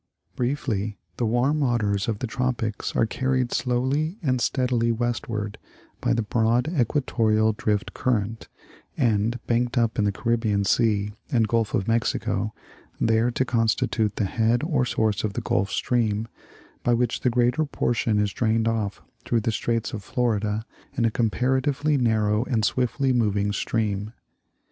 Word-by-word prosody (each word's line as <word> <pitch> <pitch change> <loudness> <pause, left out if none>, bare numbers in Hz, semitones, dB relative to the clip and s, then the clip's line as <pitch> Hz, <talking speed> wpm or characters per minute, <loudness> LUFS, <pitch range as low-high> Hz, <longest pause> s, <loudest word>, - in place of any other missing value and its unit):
Briefly, 115 -6 -1 0.2
the 120 - 0
warm 125 +7 +2
waters 105 -7 +1
of 110 -3 -1
the 125 - -3
tropics 120 -3 -2
are - - +3
carried 130 +1 0
slowly 135 - 0
and 130 -4 +1
steadily 120 -3 +1
westward 115 -3 -2 0.4
by - - 0
the 115 -1 +1
broad 115 +4 +1
equatorial 115 -7 +1
drift 105 -1 -1
current, 115 -2 -1 0.5
and 115 +1 +1
banked 120 +2 0
up 115 -2 +1
in 105 - +3
the 100 - +2
Caribbean 110 -2 0
Sea 105 -2 +2 0.2
and 115 -5 +3
Gulf 115 +3 0
of 100 -4 -1
Mexico, 115 0 0 0.5
there 115 +1 +3
to 125 +2 0
constitute 110 -2 +1
the 105 - 0
head 115 +5 +1
or 150 -6 +1
source 110 -3 0
of 105 -2 -1
the - - -3
Gulf 100 +2 0
Stream, 110 -2 0 0.5
by 120 - +2
which 120 0 0
the 125 - +1
greater 125 +5 +2
portion 115 -7 0
is 105 -1 +1
drained 115 -1 +1
off 110 -3 -2 0.2
through 115 -1 +1
the 115 - 0
straits 115 +2 -1
of 105 -3 -5
Florida 110 -2 -1 0.3
in 120 - +2
a 115 - +2
comparatively 130 +6 +1
narrow 110 -4 +2
and 115 -5 +1
swiftly 130 +1 +1
moving 105 -4 +1
stream. 105 0 -1
115 Hz, 150 wpm, -25 LUFS, 110-125 Hz, 0.5 s, are